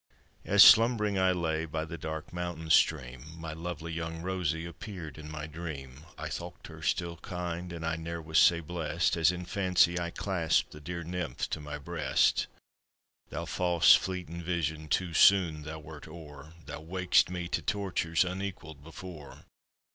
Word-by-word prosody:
As -, -, +8 dB
slumbering 110 Hz, -3 st, +6 dB
I 95 Hz, 0 st, +4 dB
lay, 80 Hz, -3 st, -1 dB
by 80 Hz, 0 st, -3 dB
the 85 Hz, +1 st, -7 dB
dark 80 Hz, +1 st, -6 dB
mountain 85 Hz, -2 st, -4 dB
stream, 70 Hz, 0 st, +2 dB
My 80 Hz, -1 st, -5 dB
lovely 85 Hz, 0 st, -6 dB
young 80 Hz, 0 st, -4 dB
Rosie 90 Hz, -3 st, -1 dB
appeared 85 Hz, -3 st, -8 dB
in 75 Hz, 0 st, -9 dB
my 75 Hz, 0 st, -5 dB
dream; 75 Hz, -3 st, -8 dB
I -, -, -5 dB
thocht -, -, -7 dB
her -, -, -11 dB
still 85 Hz, -1 st, -1 dB
kind, 90 Hz, 0 st, -5 dB
and 85 Hz, -1 st, -6 dB
I 80 Hz, 0 st, -1 dB
ne'er 85 Hz, +1 st, -5 dB
was 80 Hz, 0 st, +1 dB
sae 85 Hz, -1 st, +5 dB
blest 85 Hz, 0 st, -1 dB
As 80 Hz, 0 st, +4 dB
in 90 Hz, 0 st, -6 dB
fancy 90 Hz, -2 st, +2 dB
I 85 Hz, 0 st, -2 dB
clasped 85 Hz, -3 st, 0 dB
the 75 Hz, -, -11 dB
dear 85 Hz, +3 st, -5 dB
Nymph 85 Hz, -5 st, -3 dB
to -, -, -2 dB
my 75 Hz, 0 st, -6 dB
breast. 70 Hz, -, +1 dB, 0.8 s
Thou -, -, -4 dB
fause 90 Hz, -2 st, +5 dB
fleetin' 90 Hz, -2 st, -1 dB
vision, 80 Hz, -3 st, -2 dB
too 85 Hz, +3 st, 0 dB
soon 85 Hz, -5 st, +5 dB
thou 75 Hz, +1 st, -7 dB
wert 75 Hz, -1 st, -11 dB
o'er; 75 Hz, -2 st, -11 dB
Thou 75 Hz, 0 st, -7 dB
wak'd'st 90 Hz, +2 st, +2 dB
me 90 Hz, -1 st, -4 dB
tae -, -, -1 dB
tortures, 95 Hz, -4 st, 0 dB
unequalled 90 Hz, -6 st, -6 dB
before. 80 Hz, -1 st, -10 dB
85 Hz, 165 wpm, -30 LUFS, 80-90 Hz, 0.8 s, As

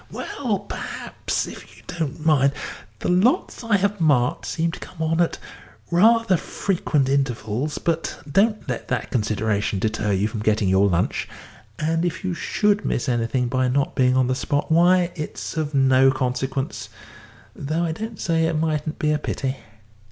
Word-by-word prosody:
"Well, 205 Hz, -7 st, -3 dB
perhaps, -, -, -3 dB
if -, -, -11 dB
you -, -, -18 dB
don't 160 Hz, -2 st, -4 dB
mind. 140 Hz, -3 st, +4 dB, 0.5 s
The -, -, -2 dB
lots 200 Hz, +7 st, +2 dB
I 220 Hz, -3 st, +3 dB
have 200 Hz, 0 st, -1 dB
marked 140 Hz, -6 st, +2 dB
seem 165 Hz, 0 st, -1 dB
to -, -, -8 dB
come 180 Hz, -, -11 dB
on 160 Hz, +1 st, +1 dB
at 170 Hz, -, +1 dB, 0.5 s
rather 215 Hz, +2 st, +4 dB
frequent 160 Hz, -7 st, -1 dB
intervals, 135 Hz, 0 st, -1 dB
but 165 Hz, -1 st, -2 dB
don't 210 Hz, +8 st, +2 dB
let -, -, -4 dB
that -, -, -2 dB
consideration 110 Hz, -3 st, 0 dB
deter 110 Hz, +1 st, -1 dB
you 100 Hz, +2 st, +1 dB
from 110 Hz, 0 st, -5 dB
getting 105 Hz, -2 st, +1 dB
your 95 Hz, +2 st, +4 dB
lunch, 85 Hz, -1 st, 0 dB, 0.5 s
and 165 Hz, +2 st, 0 dB
if 175 Hz, +2 st, -2 dB
you 185 Hz, -1 st, -1 dB
should 210 Hz, +4 st, +1 dB
miss 125 Hz, -, -1 dB
anything 120 Hz, +1 st, 0 dB
by 130 Hz, +1 st, +1 dB
not 135 Hz, +2 st, 0 dB
being 125 Hz, 0 st, +3 dB
on 130 Hz, -, +4 dB
the 130 Hz, -, +1 dB
spot, 145 Hz, +4 st, -1 dB
why, 175 Hz, +2 st, +4 dB
it's 150 Hz, +1 st, -6 dB
of 155 Hz, -2 st, -2 dB
no 135 Hz, 0 st, +5 dB
consequence, 130 Hz, +1 st, -2 dB, 0.7 s
though 155 Hz, +4 st, -2 dB
I 165 Hz, -, 0 dB
don't 220 Hz, +5 st, -6 dB
say 165 Hz, -1 st, +1 dB
it 165 Hz, -1 st, -1 dB
mightn't 155 Hz, -1 st, -1 dB
be 150 Hz, -, +1 dB
a 150 Hz, -, +1 dB
pity. 135 Hz, -2 st, -3 dB
150 Hz, 165 wpm, -23 LUFS, 125-170 Hz, 0.7 s, no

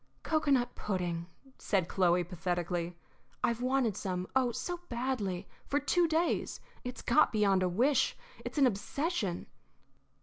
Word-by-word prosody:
"Cocoanut 280 Hz, -6 st, +2 dB
pudding," 175 Hz, -4 st, -2 dB, 0.3 s
said 190 Hz, -5 st, +1 dB
Chloe, 180 Hz, -1 st, +3 dB
pathetically. 175 Hz, 0 st, -2 dB, 0.5 s
"I've 235 Hz, -1 st, +1 dB
wanted 255 Hz, -4 st, +2 dB
some 185 Hz, -2 st, -2 dB
oh, 255 Hz, -2 st, +3 dB
so 350 Hz, +9 st, -3 dB
badly, 235 Hz, -7 st, -2 dB, 0.2 s
for 285 Hz, -, +2 dB
two 340 Hz, +4 st, +3 dB
days. 325 Hz, +2 st, 0 dB, 0.2 s
It's 250 Hz, 0 st, -6 dB
got 235 Hz, -, +4 dB
beyond 200 Hz, -3 st, +3 dB
a 185 Hz, -, +2 dB
wish; 255 Hz, +10 st, +2 dB, 0.3 s
it's -, -, -6 dB
an 280 Hz, -, +6 dB
obsession." 230 Hz, -, -1 dB
215 Hz, 130 wpm, -32 LUFS, 180-265 Hz, 0.5 s, an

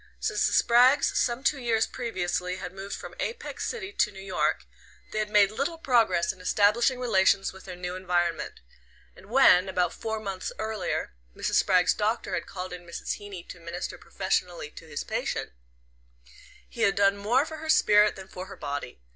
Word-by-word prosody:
Since -, -, +1 dB
the -, -, -2 dB
Spraggs, 250 Hz, +4 st, +5 dB
some 240 Hz, +2 st, 0 dB
two 275 Hz, 0 st, +2 dB
years 230 Hz, -3 st, +1 dB
previously, 180 Hz, -6 st, -3 dB
had 180 Hz, -1 st, -7 dB
moved 195 Hz, +1 st, -6 dB
from -, -, -9 dB
Apex 465 Hz, 0 st, -4 dB
City 405 Hz, -5 st, -5 dB
to 210 Hz, -, +2 dB
New 195 Hz, -, -11 dB
York, 195 Hz, -1 st, -1 dB, 0.5 s
they 215 Hz, -, -2 dB
had 215 Hz, -1 st, -1 dB
made 205 Hz, -1 st, +5 dB
little 280 Hz, +9 st, -2 dB
progress 230 Hz, -, +2 dB
in 185 Hz, -, -16 dB
establishing 215 Hz, +7 st, +3 dB
relations 195 Hz, -5 st, +2 dB
with 190 Hz, -, -13 dB
their 185 Hz, -2 st, -7 dB
new 180 Hz, 0 st, -5 dB
environment; 175 Hz, -2 st, -1 dB, 0.5 s
and 190 Hz, -, -16 dB
when, 205 Hz, -7 st, +6 dB
about 180 Hz, -1 st, 0 dB
four 220 Hz, -1 st, -4 dB
months 195 Hz, -3 st, -4 dB
earlier, 215 Hz, -, -3 dB, 0.2 s
Mrs. -, -, +1 dB
Spragg's 185 Hz, -2 st, +3 dB
doctor 220 Hz, +2 st, -1 dB
had -, -, -2 dB
called 185 Hz, -1 st, -6 dB
in 180 Hz, 0 st, -8 dB
Mrs. 170 Hz, 0 st, -4 dB
Heeny 200 Hz, -4 st, -8 dB
to 180 Hz, -, -9 dB
minister 170 Hz, +1 st, -6 dB
professionally 180 Hz, -4 st, -2 dB
to 165 Hz, -, -12 dB
his 145 Hz, -2 st, -4 dB
patient, -, -, -3 dB, 1.2 s
he 235 Hz, -, -8 dB
had 200 Hz, -3 st, +3 dB
done 200 Hz, 0 st, +4 dB
more 230 Hz, +8 st, +2 dB
for 315 Hz, 0 st, -7 dB
her 315 Hz, +1 st, -7 dB
spirit 210 Hz, -8 st, +5 dB
than 190 Hz, -1 st, -10 dB
for 185 Hz, 0 st, -8 dB
her 195 Hz, -, -10 dB
body. 145 Hz, -, -5 dB
200 Hz, 180 wpm, -27 LUFS, 180-235 Hz, 1.2 s, when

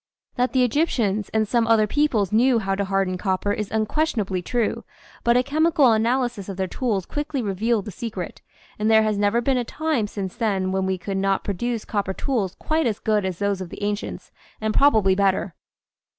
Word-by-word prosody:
That 250 Hz, 0 st, 0 dB
the 260 Hz, -1 st, +4 dB
Egyptians 230 Hz, -, 0 dB
and 220 Hz, -1 st, +1 dB
some 235 Hz, +1 st, +1 dB
other 225 Hz, -2 st, +4 dB
peoples 220 Hz, -6 st, +1 dB
knew 240 Hz, +3 st, +4 dB
how 195 Hz, -3 st, -1 dB
to 200 Hz, +1 st, -1 dB
harden 190 Hz, -1 st, 0 dB
copper 195 Hz, +1 st, 0 dB
is 210 Hz, -1 st, -3 dB
unquestionably 215 Hz, -, -1 dB
true, 235 Hz, +4 st, -1 dB, 0.4 s
but 235 Hz, +1 st, +4 dB
a 250 Hz, -, +3 dB
chemical 300 Hz, -2 st, +3 dB
analysis 230 Hz, -2 st, 0 dB
of 195 Hz, -, -6 dB
their 190 Hz, -, 0 dB
tools 200 Hz, -1 st, -2 dB
quickly 295 Hz, -1 st, -3 dB
revealed 215 Hz, 0 st, 0 dB
the 210 Hz, -, -6 dB
secret, 195 Hz, -4 st, -6 dB, 0.4 s
#nd 215 Hz, -, +2 dB
there 220 Hz, 0 st, +6 dB
has 215 Hz, -2 st, 0 dB
never 205 Hz, +3 st, +2 dB
been 260 Hz, +2 st, +1 dB
a -, -, 0 dB
time 295 Hz, -3 st, -1 dB
since 195 Hz, -3 st, -5 dB
then 195 Hz, -5 st, 0 dB
when 190 Hz, 0 st, 0 dB
we 190 Hz, 0 st, 0 dB
could 195 Hz, +2 st, -4 dB
not 195 Hz, 0 st, +1 dB
pro 200 Hz, -, -2 dB
duce 235 Hz, +3 st, -3 dB
copper 200 Hz, -3 st, -2 dB
tools 215 Hz, -9 st, -1 dB
quite 315 Hz, -3 st, 0 dB
as 215 Hz, -3 st, -1 dB
good 215 Hz, -3 st, 0 dB
as 185 Hz, -3 st, -3 dB
those 200 Hz, -1 st, -1 dB
of 180 Hz, -, -6 dB
the 205 Hz, -, -8 dB
ancients, 205 Hz, 0 st, -4 dB, 0.3 s
and 220 Hz, 0 st, -1 dB
probably 220 Hz, -9 st, +4 dB
better. 190 Hz, -1 st, +1 dB
215 Hz, 200 wpm, -23 LUFS, 195-245 Hz, 0.4 s, there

